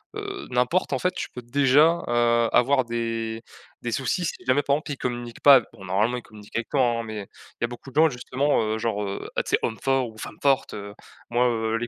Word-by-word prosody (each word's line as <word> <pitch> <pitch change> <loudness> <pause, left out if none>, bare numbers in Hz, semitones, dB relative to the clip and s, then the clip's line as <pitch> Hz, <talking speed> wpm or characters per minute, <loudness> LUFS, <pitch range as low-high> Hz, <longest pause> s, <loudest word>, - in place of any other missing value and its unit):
heu, 405 -1 -6
n'importe, 125 +9 +1
en - - 0
fait, 180 - +1
tu - - -4
peux 125 - -8
déjà, 140 +6 +4
heu, 120 -1 +3
avoir 130 +1 +4
des 115 -1 -3 0.4
des 120 - -3
soucis 175 - -1
si - - -2
jamais, 130 +3 +4
par 140 - +2
exemple, 150 0 -5
il 140 - -4
communique 120 -2 -5
pas, 140 -3 +8
bon, 100 -4 -13
normalement, 105 +7 +1
il - - -6
communique 105 -1 -15
avec 115 - -2
toi, 140 - +2
hein 115 -1 0
mais 110 -3 -6 0.3
il 120 - +1
y - - -3
beaucoup 120 +3 -10
de 135 - -19
gens 160 +1 +6
justement, 130 +3 0
heu, 110 0 -1
genre, 110 -2 -1
heu, 100 0 -5
ah, - - +2
tu - - -8
sais, - - +3
homme 110 - -2
fort 135 -2 +1
ou 110 - -15
femme - - -8
forte, 135 -1 +2
heu, 100 0 -7 0.4
moi, 125 +1 +3
heu, 110 -1 -1
les 120 +1 -3
120 Hz, 245 wpm, -25 LUFS, 115-135 Hz, 0.4 s, pas